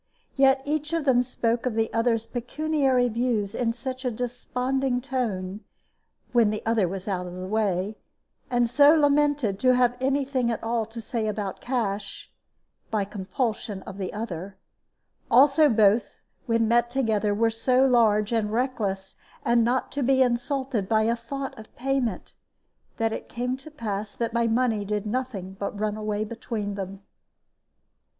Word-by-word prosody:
Yet 270 Hz, -1 st, +4 dB
each 300 Hz, +1 st, -2 dB
of 330 Hz, -3 st, 0 dB
them 250 Hz, -3 st, +4 dB
spoke 235 Hz, -1 st, -1 dB
of 235 Hz, -, -2 dB
the 225 Hz, 0 st, 0 dB
other's 230 Hz, -1 st, +1 dB
pecuniary 265 Hz, 0 st, +1 dB
views 230 Hz, -3 st, -1 dB
in 235 Hz, -2 st, 0 dB
such 255 Hz, +2 st, -6 dB
a 250 Hz, -, +1 dB
desponding 250 Hz, +2 st, -1 dB
tone 215 Hz, -8 st, -3 dB, 0.7 s
(when 235 Hz, -3 st, +4 dB
the 215 Hz, 0 st, -4 dB
other 225 Hz, -4 st, +2 dB
was 190 Hz, +2 st, -6 dB
out 180 Hz, -3 st, -2 dB
of 175 Hz, -, -8 dB
the 185 Hz, 0 st, -5 dB
way), 205 Hz, 0 st, -1 dB, 0.5 s
and 245 Hz, -2 st, +2 dB
so 285 Hz, +6 st, +6 dB
lamented 290 Hz, -8 st, +2 dB
to 255 Hz, +2 st, +4 dB
have 245 Hz, -1 st, +3 dB
any 275 Hz, +1 st, +1 dB
thing 260 Hz, -3 st, 0 dB
at 230 Hz, -, -3 dB
all 225 Hz, -1 st, -1 dB
to 225 Hz, +1 st, -9 dB
say 225 Hz, -1 st, -2 dB
about 205 Hz, -2 st, -3 dB
cash 205 Hz, -6 st, -3 dB, 0.6 s
by 210 Hz, -3 st, 0 dB
compulsion 205 Hz, 0 st, -3 dB
of 190 Hz, +1 st, -9 dB
the 185 Hz, -, -3 dB
other 195 Hz, -3 st, -6 dB, 0.7 s
also 280 Hz, +5 st, +6 dB
both, 215 Hz, 0 st, +3 dB, 0.3 s
when 230 Hz, -1 st, +2 dB
met 240 Hz, +1 st, +3 dB
together, 220 Hz, -5 st, +1 dB
were 225 Hz, +2 st, +2 dB
so 255 Hz, +3 st, +3 dB
large 220 Hz, -4 st, +3 dB
and 220 Hz, -3 st, 0 dB
reckless, 215 Hz, -6 st, -2 dB, 0.3 s
and 235 Hz, 0 st, +4 dB
not 245 Hz, +3 st, 0 dB
to 285 Hz, -, -3 dB
be 265 Hz, +1 st, +4 dB
insulted 250 Hz, -3 st, -1 dB
by 220 Hz, -1 st, +3 dB
a 230 Hz, +2 st, +2 dB
thought 270 Hz, +4 st, -6 dB
of 215 Hz, -, -13 dB
payment, 255 Hz, -6 st, -2 dB, 0.6 s
that 225 Hz, -1 st, 0 dB
it -, -, -6 dB
came 250 Hz, +2 st, -2 dB
to 270 Hz, +4 st, -12 dB
pass 215 Hz, -7 st, -4 dB
that 230 Hz, -1 st, -2 dB
my 235 Hz, -1 st, +2 dB
money 230 Hz, -2 st, +1 dB
did 210 Hz, +1 st, -2 dB
nothing 210 Hz, -5 st, -3 dB
but 200 Hz, 0 st, -4 dB
run 210 Hz, 0 st, -1 dB
away 215 Hz, -1 st, -2 dB
between 220 Hz, -2 st, -4 dB
them. 195 Hz, 0 st, -6 dB
230 Hz, 160 wpm, -26 LUFS, 210-255 Hz, 0.7 s, so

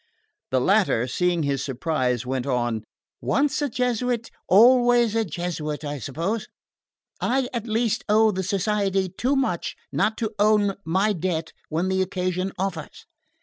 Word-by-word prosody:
The 130 Hz, -, +2 dB
latter, 185 Hz, -, +3 dB
seeing 175 Hz, +5 st, 0 dB
his 140 Hz, -1 st, -1 dB
surprise, 130 Hz, -3 st, -1 dB
went 130 Hz, 0 st, -2 dB
on: 120 Hz, -4 st, -1 dB, 0.4 s
"Once 295 Hz, +1 st, +1 dB
a 290 Hz, -, 0 dB
Jesuit, 245 Hz, -1 st, -1 dB, 0.2 s
always 240 Hz, +2 st, +5 dB
a 225 Hz, -, +2 dB
Jesuit, 160 Hz, -5 st, -4 dB
I 145 Hz, -1 st, -4 dB
suppose. 170 Hz, -, -3 dB, 0.7 s
I 265 Hz, 0 st, +1 dB
at 235 Hz, -1 st, -3 dB
least 225 Hz, 0 st, 0 dB
owe 220 Hz, +1 st, +5 dB
the 190 Hz, -1 st, -2 dB
Society 195 Hz, 0 st, 0 dB
too 250 Hz, +10 st, 0 dB
much 270 Hz, -1 st, -1 dB, 0.2 s
not 220 Hz, -, +1 dB
to 225 Hz, -1 st, -2 dB
own 205 Hz, -1 st, +3 dB
my 190 Hz, +6 st, +1 dB
debt 165 Hz, -2 st, -2 dB, 0.2 s
when 165 Hz, +4 st, 0 dB
the 190 Hz, 0 st, +1 dB
occasion 185 Hz, 0 st, -1 dB
offers. 185 Hz, -5 st, -4 dB
190 Hz, 145 wpm, -24 LUFS, 160-225 Hz, 0.7 s, always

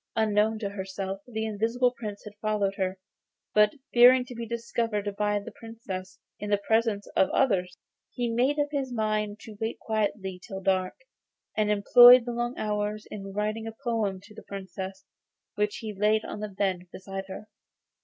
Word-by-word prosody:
Unknown 220 Hz, 0 st, +2 dB
to 210 Hz, -2 st, -3 dB
herself 195 Hz, 0 st, -5 dB
the 220 Hz, -2 st, -3 dB
Invisible 230 Hz, +4 st, +1 dB
Prince 210 Hz, -4 st, -6 dB
had 210 Hz, -, -9 dB
followed 210 Hz, -2 st, 0 dB
her, 190 Hz, -1 st, -2 dB, 0.6 s
but 210 Hz, +2 st, +4 dB, 0.2 s
fearing 250 Hz, +1 st, +7 dB
to 250 Hz, -, -9 dB
be 235 Hz, -1 st, -6 dB
discovered 230 Hz, -3 st, -2 dB
by 210 Hz, 0 st, +1 dB
the 200 Hz, -, -9 dB
Princess 220 Hz, -5 st, -8 dB, 0.2 s
in 210 Hz, -, -5 dB
the 205 Hz, -, +3 dB
presence 220 Hz, 0 st, +1 dB
of 190 Hz, -, +4 dB
others, 185 Hz, -9 st, +1 dB, 0.3 s
he 245 Hz, -1 st, -2 dB
made 250 Hz, +5 st, +1 dB
up 290 Hz, 0 st, +1 dB
his 275 Hz, -3 st, -2 dB
mind 215 Hz, -2 st, -1 dB
to 220 Hz, -, -10 dB
wait 220 Hz, +1 st, -2 dB
quietly 205 Hz, -4 st, -2 dB
till 195 Hz, -, -6 dB
dark; 185 Hz, -1 st, 0 dB, 0.6 s
and 210 Hz, -1 st, +1 dB
employed 240 Hz, +4 st, +8 dB
the 240 Hz, -, -3 dB
long 240 Hz, +1 st, -2 dB
hours 210 Hz, 0 st, -2 dB
in 195 Hz, -2 st, -6 dB
writing 215 Hz, +2 st, -2 dB
a 225 Hz, -, -7 dB
poem 220 Hz, -5 st, 0 dB
to 205 Hz, +2 st, -16 dB
the -, -, -11 dB
Princess, 190 Hz, 0 st, -7 dB, 0.5 s
which 210 Hz, 0 st, 0 dB
he 215 Hz, -2 st, -5 dB
laid 210 Hz, +2 st, +2 dB
on -, -, -6 dB
the 210 Hz, 0 st, -4 dB
bed 190 Hz, -2 st, -2 dB
beside 195 Hz, 0 st, -6 dB
her. 195 Hz, +2 st, -8 dB
210 Hz, 175 wpm, -27 LUFS, 195-230 Hz, 0.6 s, employed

